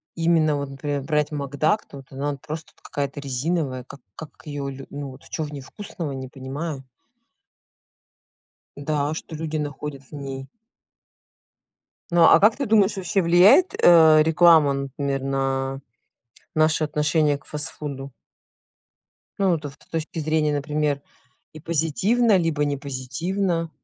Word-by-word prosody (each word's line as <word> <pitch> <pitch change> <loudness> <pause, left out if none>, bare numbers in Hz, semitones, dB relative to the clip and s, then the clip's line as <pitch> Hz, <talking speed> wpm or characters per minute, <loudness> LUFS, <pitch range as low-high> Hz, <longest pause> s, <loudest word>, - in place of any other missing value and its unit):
именно 165 -3 +2
вот, 140 -1 -3
например, 140 +1 -3
брать 150 0 0
макдак, 145 +7 0
то - - -11
вот 135 -1 -13
она, 140 +2 -2
ну, - - -8
просто 155 +3 -7
вот - - -29
какая-то 140 0 -4
резиновая, 140 -1 -2
как 140 +2 -12 0.2
как 160 - -8 0.2
её 145 -2 -4
лю 135 0 -9
ну 140 -1 -6
вот 130 +1 -14
чё 160 - -3
в 150 0 -7
ней 140 - -6
вкусного, 165 0 -7
не 130 -1 -6
понимаю. 135 +2 -6 1.9
Да. 145 0 -1
А - - -2
что 160 0 -7
люди 155 0 -3
находят 145 -2 -5
в 130 - -22
ней? 135 -2 -6 1.7
Ну 170 -1 +5
а 165 - +7
как 215 +2 +5
ты 280 - -1
думаешь, 210 -2 +3
вообще 190 +1 0
влияет, 180 - +6
э, 160 -3 +7
реклама, 160 -3 +5
например, 140 0 -3
на 135 0 -1 0.7
наше 155 0 +2
отношение 150 -1 +1
к - - -26
фастфуду? 145 -2 -5 1.3
Ну 195 -1 +3
вот 160 -2 -1
ст 140 -1 -9
с - - -25
точки 160 0 -4
зрения, 155 -1 +1
например, 145 0 -1 0.5
и 155 - -10
позитивно 185 +8 +2
либо 160 -4 0
не 145 -1 -1
позитивно? 165 +6 -2
150 Hz, 150 wpm, -23 LUFS, 140-165 Hz, 1.9 s, а